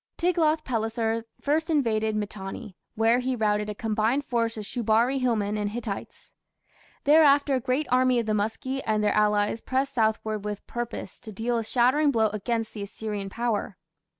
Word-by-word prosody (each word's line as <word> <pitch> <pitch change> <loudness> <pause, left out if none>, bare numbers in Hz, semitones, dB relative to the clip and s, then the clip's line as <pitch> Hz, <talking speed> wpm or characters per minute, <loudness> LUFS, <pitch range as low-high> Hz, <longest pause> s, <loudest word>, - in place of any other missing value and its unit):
Tiglath 325 -3 +2
pileser 225 -1 -1
first 315 +3 0
invaded 220 -8 +1
Mitanni, 205 0 -5 0.2
where 225 +2 +3
he 255 0 -1
routed 210 -2 0
a 210 - -4
combined 225 +6 0
force 230 -2 -1
of 210 - -5
Shubari 235 +4 +1
hillmen 215 -5 0
and 205 -1 -1
Hittites. 215 -2 -6 0.7
Thereafter 290 -1 +5
a 260 - +2
great 260 +4 0
army 255 0 +4
of 235 - 0
the 215 - 0
Muski 225 +6 -2
and 215 -1 +1
their 210 - +2
allies 210 +1 +2
pressed 265 +1 -1
southward 220 -2 0
with 210 -1 -5
purpose 240 -5 -5
to 220 - -10
deal 225 +4 -2
a - - -3
shattering 255 +6 +3
blow 225 -5 +2
against 225 +2 -2
the 210 - -6
Assyrian 205 0 -5
power. 225 -3 -2
225 Hz, 165 wpm, -26 LUFS, 215-255 Hz, 0.7 s, Thereafter